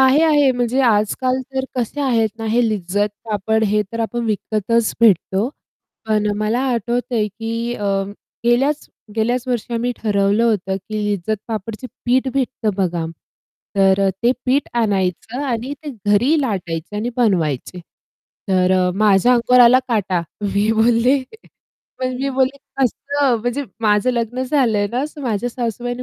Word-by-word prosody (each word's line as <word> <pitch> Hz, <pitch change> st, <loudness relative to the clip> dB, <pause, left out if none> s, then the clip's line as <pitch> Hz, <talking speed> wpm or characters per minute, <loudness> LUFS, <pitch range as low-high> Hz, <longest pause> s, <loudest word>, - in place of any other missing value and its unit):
आहे, 265 Hz, +4 st, +5 dB
आहे 295 Hz, -4 st, +4 dB
म्हणजे 245 Hz, +1 st, 0 dB
आजकाल 245 Hz, +3 st, +1 dB
तर 265 Hz, 0 st, 0 dB
कसे 250 Hz, +4 st, -2 dB
आहेत 235 Hz, -5 st, +2 dB
ना 225 Hz, -, -5 dB
हे 235 Hz, +3 st, +2 dB
लिज्जत 205 Hz, 0 st, 0 dB, 0.2 s
पापड 220 Hz, 0 st, 0 dB
हे 210 Hz, +1 st, +2 dB
तर 230 Hz, -, -3 dB
आपण 235 Hz, +1 st, -2 dB
विकतच 220 Hz, +1 st, 0 dB
भेटतो. 205 Hz, 0 st, +3 dB, 0.6 s
पण 210 Hz, -1 st, +2 dB
मला 215 Hz, +3 st, 0 dB
आठवतंय 235 Hz, -1 st, -1 dB
की 230 Hz, +3 st, -4 dB
अ, 205 Hz, -, -5 dB, 0.6 s
गेल्याच 270 Hz, +5 st, +1 dB, 0.3 s
गेल्याच 240 Hz, +3 st, +1 dB
वर्षी 240 Hz, -1 st, -2 dB
आम्ही 245 Hz, +2 st, 0 dB
ठरवलं 205 Hz, +1 st, +1 dB
होतं 195 Hz, -4 st, 0 dB
की 210 Hz, +2 st, -4 dB
लिज्जत 205 Hz, +1 st, -1 dB
पापडचे 220 Hz, +2 st, -5 dB, 0.2 s
पीठ 255 Hz, +2 st, +2 dB
भेटतं 250 Hz, -5 st, 0 dB
बघा. 175 Hz, -4 st, -1 dB, 0.7 s
तर 195 Hz, 0 st, +4 dB
अ, -, -, +3 dB
ते 240 Hz, +2 st, +4 dB
पीठ 270 Hz, +3 st, +2 dB
आणायचं 205 Hz, -, -1 dB
आणि 245 Hz, +2 st, -2 dB
ते 295 Hz, -, -4 dB, 0.2 s
घरी 250 Hz, +10 st, +3 dB
लाटायचे 185 Hz, -, -3 dB
आणि 230 Hz, +4 st, -2 dB
बनवायचे. 180 Hz, -, 0 dB, 0.7 s
तर 185 Hz, -1 st, +3 dB
अ, 185 Hz, -1 st, +2 dB
माझ्या 210 Hz, +3 st, +4 dB
अंगावर 250 Hz, +1 st, +4 dB
आला 245 Hz, +2 st, +7 dB
काटा. 195 Hz, -6 st, 0 dB, 0.2 s
मी 205 Hz, +2 st, +1 dB
बोलले 240 Hz, +4 st, +3 dB, 0.8 s
पण 255 Hz, 0 st, -2 dB
मी 275 Hz, -, 0 dB
बोलली 265 Hz, +1 st, +2 dB, 0.2 s
कसं 275 Hz, +1 st, +1 dB
म्हणजे 245 Hz, +5 st, -2 dB, 0.2 s
माझं 210 Hz, +2 st, +3 dB
लग्न 240 Hz, +1 st, -2 dB
झालंय 245 Hz, -7 st, +1 dB
ना 250 Hz, +3 st, 0 dB, 0.2 s
माझ्या 235 Hz, -2 st, -1 dB
सासूबाईंनी 245 Hz, +1 st, -3 dB
230 Hz, 145 wpm, -19 LUFS, 205-250 Hz, 0.8 s, आला